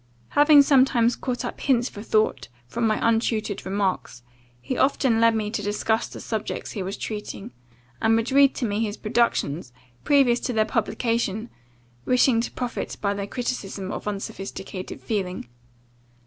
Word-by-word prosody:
Having 290 0 +7
sometimes 255 -4 +4
caught 250 -1 -3
up - - -6
hints 245 -3 +2
for 205 - -9
thought, 215 - +1 0.2
from 230 - -1
my 215 - +1
untutored 225 -2 0
remarks, 190 -11 -2 0.4
he 125 - -4
often 260 -4 +2
led 230 0 +5
me 210 -1 -2
to 215 - -2
discuss 210 +2 0
the - - -10
subjects 220 -2 -4
he 200 - -4
was 190 +2 -4
treating, 210 +1 -6 0.5
and 225 0 +4
would 230 +3 0
read 275 0 +5
to 250 - -2
me 205 -1 -1
his 215 -2 -2
productions, 195 - 0 0.3
previous 270 -5 +4
to 250 - -3
their 215 -1 +2
publication, 225 0 -1 0.5
wishing 250 - +3
to - - -3
profit 245 -2 -4
by 200 -1 0
the 200 0 -4
criticism 205 -5 -4
of - - -6
unsophisticated 195 -2 -6
feeling. 185 - -3
225 Hz, 155 wpm, -24 LUFS, 205-245 Hz, 0.5 s, Having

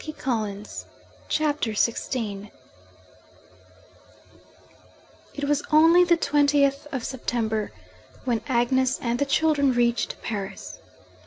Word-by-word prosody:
THE 310 - -6
FOURTH - - -24
PART 210 -5 -3 0.4
CHAPTER 300 -6 0
XVI 210 -2 -2 2.9
It 285 - -5
was 290 0 +1
only 330 +3 +6
the 345 -1 +3
twentieth 285 -2 +2
of 260 -4 -3
September, 225 -4 -2 0.5
when 235 -3 0
Agnes 260 +1 +2
and 240 0 -2
the 285 - +2
children 285 -3 +2
reached 240 -1 0
Paris. 200 -3 -6
260 Hz, 100 wpm, -25 LUFS, 230-290 Hz, 2.9 s, only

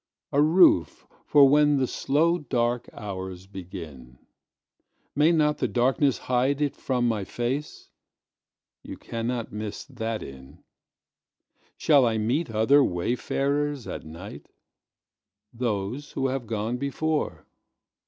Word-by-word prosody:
A 140 - +3
roof 155 - +4 0.2
for 145 -2 +7
when 145 +1 +4
the 130 - +2
slow 165 +7 +1
dark 120 -3 -1
hours 95 -3 -7
begin. 85 -10 -10 1.0
May 150 +4 +4
not 150 -2 +2
the - - +1
darkness 130 +2 +2
hide 130 +3 0
it 145 -2 0
from 125 -2 -1
my 110 -4 -1
face? 125 +9 -4 0.9
You - - -9
cannot 115 0 -4
miss 105 -1 -5
that 115 -4 -4
inn. 65 -1 -12 1.1
Shall 145 -4 +4
I 110 -1 0
meet 120 +8 0
other 115 +6 +4
wayfarers 135 +8 -1
at - - -6
night? 85 +6 -10 1.1
Those 115 +3 -3
who 135 0 0
have 130 -3 -3
gone 110 +2 -2
before. 150 +3 -2
125 Hz, 115 wpm, -26 LUFS, 105-145 Hz, 1.1 s, for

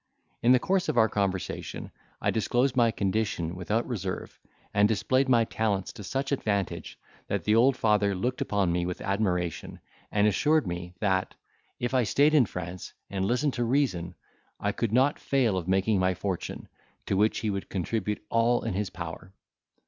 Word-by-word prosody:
In 120 - +4
the 130 - +7
course 190 +6 0
of - - -1
our 110 -1 +6
conversation, 100 -3 -3 0.3
I - - +1
disclosed 120 +4 +1
my 120 -2 +4
condition 95 -5 -1
without 105 +6 -1
reserve, 95 -6 -5 0.3
and 105 0 +5
displayed 130 +6 +1
my 120 -2 +5
talents 105 -4 -1
to 110 - -9
such 135 +7 -2
advantage, 100 -8 -2 0.3
that - - -2
the 105 - +2
old 125 +4 +4
father 105 -5 +2
looked 125 +7 -2
upon 100 -4 +1
me 90 0 0
with 90 - -4
admiration, 90 -4 -1 0.3
and 105 0 +3
assured 150 +7 +3
me, 90 0 -5
that, 95 -3 0 0.4
if 120 +1 -2
I 130 - +4
stayed 145 +6 +3
in 135 -8 +5
France, 90 0 -7 0.2
and 95 -1 -1
listened 125 +6 +1
to 120 - -1
reason, 115 -10 0 0.4
I 100 - 0
could 115 +1 -2
not 130 +5 +3
fail 125 -7 +1
of 90 -2 -3
making 95 +2 +2
my 95 0 +2
fortune, 90 0 -4 0.4
to - - 0
which 105 +3 +2
he 110 - 0
would 100 -1 -4
contribute 105 +2 -2
all 115 +1 +3
in - - -2
his 100 +1 -2
power. 85 +1 -8
105 Hz, 175 wpm, -28 LUFS, 95-120 Hz, 0.4 s, the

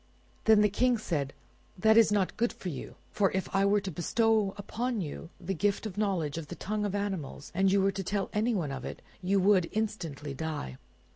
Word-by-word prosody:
Then 220 -1 +7
the 210 - +6
King 245 +4 +2
said, 150 -10 -2 0.5
"That 220 +4 +5
is 225 -2 +6
not 200 -3 +1
good 235 +1 +1
for 185 - -6
you; 140 -6 -7 0.2
for 195 -2 +2
if 190 0 -1
I 195 0 +4
were 205 +1 +3
to 190 - -4
bestow 215 +4 +2
upon 235 +3 -2
you 165 -1 -5
the 190 +1 -3
gift 200 +4 0
of 215 - -4
the 205 - -6
knowledge 170 -7 0
of 155 - -7
the 175 - -7
tongue 210 +3 -2
of 205 -1 -2
animals, 190 -9 -4
and 190 +2 +3
you 195 0 +4
were 195 - +3
to 195 0 -4
tell 200 +1 -2
anyone 210 -8 0
of 135 -2 -5
it, - - -7 0.2
you 195 +2 +2
would 185 -3 +4
instantly 170 -10 -3
die. 140 - -4
195 Hz, 215 wpm, -30 LUFS, 170-210 Hz, 0.5 s, Then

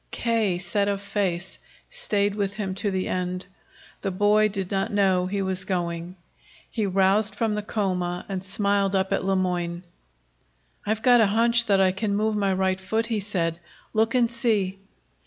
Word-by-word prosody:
K., 225 -6 0
set 195 +3 0
of 200 -1 0
face, 190 -3 -2 0.3
stayed 205 - 0
with 200 -1 -2
him 195 -3 -3
to 200 +2 -2
the 190 -1 -2
end. 180 0 -2 0.6
The 195 - -1
boy 205 +3 +3
did 195 -2 -4
not 195 -1 0
know 190 -3 +2
he 200 +1 -1
was 190 -1 -1
going. 175 -1 -3 0.6
He 215 -3 -1
roused 195 +2 +2
from 220 0 0
the 210 - -1
coma 180 -4 -2
and 190 -2 -4
smiled 200 0 +1
up 190 +1 +1
at 195 - 0
Le 195 0 +1
Moyne. 175 -2 -1 1.0
"I've 220 +1 -1
got 245 -2 +6
a 215 - +5
hunch 235 +3 +3
that 200 -2 +4
I 190 -1 +4
can 200 +2 -1
move 215 +1 +1
my 200 -2 +1
right 190 0 0
foot," 220 +4 -1
he 230 -2 -1
said. 175 -5 -2 0.3
"Look 220 +2 +2
and 240 -2 +3
see." 210 -5 0
195 Hz, 175 wpm, -25 LUFS, 185-215 Hz, 1.0 s, got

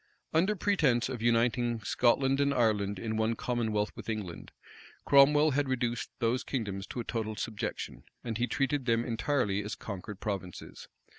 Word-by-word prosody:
Under 185 +7 +3
pretence 150 - +2
of 125 -4 -5
uniting 120 0 +2
Scotland 135 +5 +2
and 140 0 +3
Ireland 105 -4 +1
in 110 +2 -3
one 110 +1 +1
commonwealth 110 -4 -1
with - - -8
England, 100 -6 -5 0.5
Cromwell 145 +2 +6
had 140 0 0
reduced 120 -1 -1
those 120 +1 0
kingdoms 100 -7 -3
to - - -6
a - - -2
total 110 -2 -3
subjection; 105 0 -4 0.2
and 115 -2 -3
he 120 - +1
treated 135 0 0
them 115 0 +2
entirely 115 -4 0
as 105 - -4
conquered 100 0 -7
provinces. 95 -4 -6
120 Hz, 155 wpm, -30 LUFS, 110-130 Hz, 0.5 s, Cromwell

